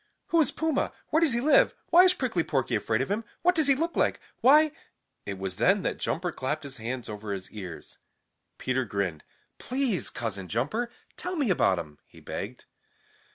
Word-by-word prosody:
"Who 335 - +4
is 295 - +2
Puma? 320 -3 0 0.2
Where 315 - +3
does 315 -7 +4
he 235 - +1
live? 310 - +4 0.2
Why 355 +2 +8
is 365 0 +5
Prickly 230 - 0
Porky 135 -5 -1
afraid 110 +1 +1
of 135 - -2
him? 215 +3 0 0.2
What 360 +1 +5
does 315 -5 +4
he 275 - +6
look 330 +5 -2
like? - - +1 0.2
Why 300 +5 +6 0.3
" 130 -1 -51
It 100 -1 -4
was 95 -1 -5
then 190 - +3
that - - -2
Jumper 175 +1 -1
clapped 150 +2 -3
his 140 -1 -8
hands 120 +2 -4
over 105 -1 -6
his 95 -1 -7
ears. 95 -6 -9 0.6
Peter 130 0 0
grinned. 100 -8 -3 0.4
"Please, 255 -7 -1
Cousin 100 -5 -4
Jumper, 145 - -1 0.3
tell 365 +1 -3
me 280 - +1
about 95 - +3
him," 75 -3 -7
he - - -16
begged. - - -6
160 Hz, 195 wpm, -28 LUFS, -, 0.6 s, Why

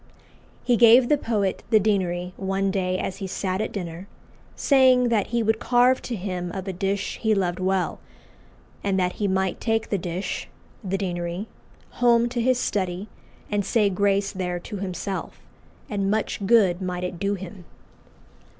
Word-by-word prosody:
He 245 -2 +3
gave 240 +2 +7
the 295 - +5
poet 210 -7 -1
the 220 - +5
deanery 185 -4 0
one 195 0 -1
day 185 -1 0
as 185 - -3
he 195 - -5
sat 185 +1 -2
at 220 - -2
dinner, 175 -1 -6 0.5
saying 255 -3 +4
"that 220 -4 +1
he 235 -1 0
would 220 0 +1
carve 250 +1 +3
to 245 - -4
him 180 -3 -4
of 190 0 -5
a 190 - -2
dish 195 +2 -2
he 220 -1 +2
loved 180 -2 -1
well, 185 0 0 0.8
and 195 -1 +1
that 180 -1 +1
he 205 - +2
might 190 -1 0
take 225 -1 0
the 200 - +1
dish 175 +2 -4 0.4
(the 195 0 -1
deanery) 175 0 -3 0.6
home 235 -1 +5
to 240 -1 -2
his 255 +1 +3
study 190 -2 -2 0.4
and 205 -1 +1
say 205 0 +2
grace 200 +1 +1
there 180 -2 -3
to 205 +3 -7
himself, 190 0 -4 0.5
and 200 -5 -1
much 210 -1 -1
good 195 -5 +4
might 180 -1 -3
it 180 -1 -4
do 200 +1 0
him." 185 -1 -9
195 Hz, 170 wpm, -24 LUFS, 185-220 Hz, 0.8 s, gave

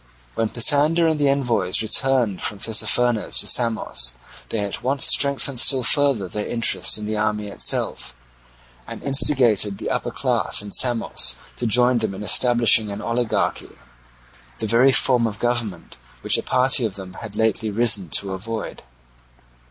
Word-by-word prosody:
When 110 - -2
Pisander 145 +8 +2
and 160 -2 0
the 145 -1 +2
envoys 115 -9 0
returned 120 -3 0
from 105 - -3
Tissaphernes 115 +2 0
to - - -1
Samos 110 - 0 0.3
they 110 - -3
at 100 -1 -5
once 135 +1 0
strengthened 140 -2 +2
still 130 0 +3
further 140 -7 +2
their 105 +3 -6
interest 115 -2 +2
in 105 - -7
the 110 0 -3
army 105 -1 -2
itself, 100 - -1 0.7
and - - -9
instigated 125 -8 +2
the - - -5
upper - - -2
class - - 0
in 100 - -9
Samos 120 0 +1 0.2
to 120 - -3
join 125 +2 +2
them 110 -3 -4
in 100 - -8
establishing 115 -2 +2
an 100 - -7
oligarchy, 115 +1 -3 0.8
the - - -5
very 120 +5 +3
form 125 -3 +2
of 105 -2 -7
government 120 - -4 0.2
which - - +1
a - - -3
party 130 0 +1
of 105 -4 -3
them 95 -2 -9
had 110 -3 -8
lately 110 0 -1
risen 105 -4 +1
to 95 +4 -3
avoid. 110 +3 -6
115 Hz, 155 wpm, -21 LUFS, 105-125 Hz, 0.8 s, still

